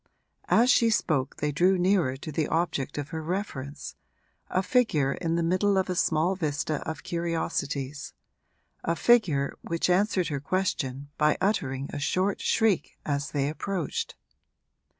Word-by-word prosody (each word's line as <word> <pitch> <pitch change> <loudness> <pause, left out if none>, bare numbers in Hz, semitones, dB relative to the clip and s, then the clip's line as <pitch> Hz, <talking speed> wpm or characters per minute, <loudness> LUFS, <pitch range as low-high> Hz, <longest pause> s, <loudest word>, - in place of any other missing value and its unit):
As 245 +3 +5
she 230 -4 +4
spoke 150 - 0
they 150 0 -1
drew 180 +6 +3
nearer 180 -8 +2
to 155 - -7
the 150 0 0
object 160 -5 -1
of 145 -1 -4
her 160 - -4
reference 155 -5 -4 0.6
a 185 - +1
figure 165 - +2
in 165 0 -2
the 170 - +1
middle 185 +4 +2
of 190 -1 +1
a - - -1
small 170 +2 +2
vista 155 -3 -2
of 150 -2 -6
curiosities, 150 -4 -3 0.7
a 170 - 0
figure 165 -11 +3
which 170 +1 0
answered 185 -1 +2
her 145 -2 -2
question 145 -5 -2
by 150 0 +3
uttering 140 -9 0
a 145 - -3
short 185 +6 0
shriek 220 -5 +1
as 140 -1 -1
they 140 -1 0
approached. 165 +1 -3
165 Hz, 150 wpm, -27 LUFS, 145-185 Hz, 0.7 s, As